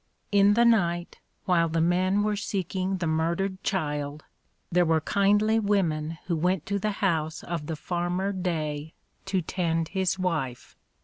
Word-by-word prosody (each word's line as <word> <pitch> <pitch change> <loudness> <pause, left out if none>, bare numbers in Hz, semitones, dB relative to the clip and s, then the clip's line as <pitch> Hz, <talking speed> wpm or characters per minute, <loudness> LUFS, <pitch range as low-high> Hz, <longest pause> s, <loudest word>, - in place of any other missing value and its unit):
In 205 0 +5
the 235 +1 +5
night, 175 -7 +2 0.3
while 170 -2 +3
the 165 +1 0
men 185 +4 +2
were 210 0 +1
seeking 190 -2 -2
the 175 - -2
murdered 170 +4 -1
child, 150 -5 -2 0.5
there 175 +1 +4
were 160 -1 +3
kindly 205 +5 +3
women 165 -7 0
who 170 - 0
went 180 +1 0
to 200 0 -1
the 210 +1 -1
house 160 -3 0
of 165 -3 -4
the 160 - -2
farmer 175 +4 -2
Day 160 -5 -3 0.3
to 190 -2 0
tend 165 -2 -1
his 190 -1 0
wife. 155 -9 -3
180 Hz, 150 wpm, -27 LUFS, 160-195 Hz, 0.5 s, In